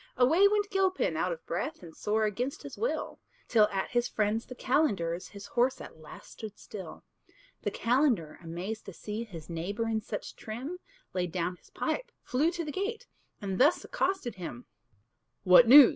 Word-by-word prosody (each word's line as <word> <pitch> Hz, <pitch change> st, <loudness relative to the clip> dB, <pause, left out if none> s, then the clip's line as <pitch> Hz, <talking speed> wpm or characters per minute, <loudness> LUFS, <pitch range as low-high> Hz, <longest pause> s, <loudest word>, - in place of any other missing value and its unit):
Away 320 Hz, +11 st, +6 dB
went 410 Hz, 0 st, +1 dB
Gilpin, 380 Hz, -1 st, +2 dB
out -, -, +1 dB
of -, -, -6 dB
breath, 310 Hz, -, -3 dB
And 165 Hz, -2 st, -11 dB
sore 215 Hz, +1 st, +1 dB
against 245 Hz, +6 st, -2 dB
his -, -, -7 dB
will, 480 Hz, +3 st, -2 dB, 0.3 s
Till 215 Hz, -3 st, +5 dB
at 195 Hz, -2 st, -2 dB
his 240 Hz, -1 st, +2 dB
friend's 215 Hz, +2 st, 0 dB
the 255 Hz, -, -8 dB
calender's 195 Hz, -, +1 dB
His 200 Hz, -1 st, -10 dB
horse 250 Hz, +2 st, +1 dB
at -, -, -10 dB
last 155 Hz, -, -12 dB
stood 215 Hz, -2 st, -8 dB
still. 195 Hz, -3 st, -9 dB, 0.6 s
The -, -, 0 dB
calender, 235 Hz, -, +1 dB
amazed 180 Hz, +6 st, -5 dB
to 195 Hz, -, -6 dB
see 215 Hz, +6 st, -5 dB
His 165 Hz, -8 st, -9 dB
neighbour 195 Hz, +7 st, -2 dB
in 220 Hz, -1 st, 0 dB
such 205 Hz, 0 st, -6 dB
trim, 260 Hz, +11 st, -6 dB, 0.3 s
Laid 180 Hz, -2 st, -1 dB
down 180 Hz, 0 st, -1 dB
his -, -, -23 dB
pipe, -, -, -2 dB
flew 285 Hz, +6 st, +2 dB
to 340 Hz, -1 st, -3 dB
the 300 Hz, -, -3 dB
gate, 430 Hz, +7 st, -3 dB, 0.4 s
And 190 Hz, -2 st, -2 dB
thus 295 Hz, +7 st, +5 dB
accosted 380 Hz, -, -1 dB
him: 125 Hz, -9 st, -6 dB, 0.8 s
"What 195 Hz, +6 st, +8 dB
news? 270 Hz, +1 st, +11 dB
225 Hz, 175 wpm, -30 LUFS, 190-295 Hz, 0.8 s, news